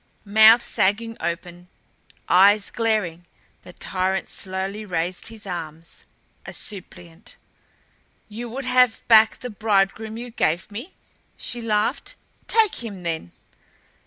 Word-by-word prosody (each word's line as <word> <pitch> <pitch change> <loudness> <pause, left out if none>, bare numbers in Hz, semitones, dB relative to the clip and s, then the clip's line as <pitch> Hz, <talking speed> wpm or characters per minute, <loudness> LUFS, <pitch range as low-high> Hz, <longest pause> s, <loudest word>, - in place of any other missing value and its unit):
Mouth 220 +3 +7
sagging 225 +4 0
open, 175 +1 -5 0.6
eyes 200 +3 +5
glaring, 205 -7 -1 0.3
the - - -13
tyrant 185 +1 -2
slowly 190 +2 -3
raised 180 -2 -2
his 220 -2 -8
arms 165 -3 -7 0.4
a - - -9
suppliant. 180 -3 -10 0.9
"You 230 +3 -7
would 265 +3 -6
have 250 -2 +2
back 220 -1 +6
the 250 - -6
bridegroom 215 +1 0
you 240 +1 -7
gave 175 -4 -1
me?" 240 - -8 0.4
she 240 - -6
laughed. 215 -2 -1 0.3
"Take 440 - +3
him, 200 -5 -7
then." 160 - -4
205 Hz, 115 wpm, -23 LUFS, 180-225 Hz, 0.9 s, Mouth